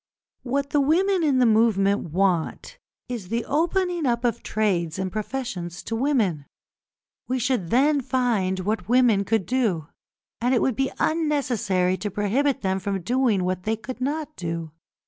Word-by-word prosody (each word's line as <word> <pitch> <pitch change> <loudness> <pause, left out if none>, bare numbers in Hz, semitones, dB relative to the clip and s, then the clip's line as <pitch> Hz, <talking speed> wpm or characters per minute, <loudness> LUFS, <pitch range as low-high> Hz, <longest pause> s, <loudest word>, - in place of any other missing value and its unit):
What 275 +2 -2
the 290 - +3
women 365 +6 +2
in 285 -4 +3
the 255 - +4
movement 210 -4 +3
want 190 - -1 0.3
is 235 -7 -5
the 230 +1 -1
opening 345 +1 0
up 235 0 0
of 235 - 0
trades 180 -7 -1
and 190 -1 -2
professions 210 -6 -4
to 225 - -3
women. 225 - 0 0.8
We 255 - 0
should 245 -8 -1
then 280 - +3
find 225 -8 0
what 210 +3 -2
women 240 -5 +4
could 220 -2 +1
do, 185 - 0 0.5
and 250 +2 +2
it - - +2
would 260 - +1
be 265 +3 0
unnecessary 250 - +1
to 210 - -3
prohibit 245 +8 0
them 190 -1 0
from 195 0 -3
doing 235 -3 +1
what 185 0 -1
they 220 +4 -1
could 250 +3 -8
not 300 +3 -2
do. 165 -2 -4
230 Hz, 160 wpm, -24 LUFS, 190-270 Hz, 0.8 s, the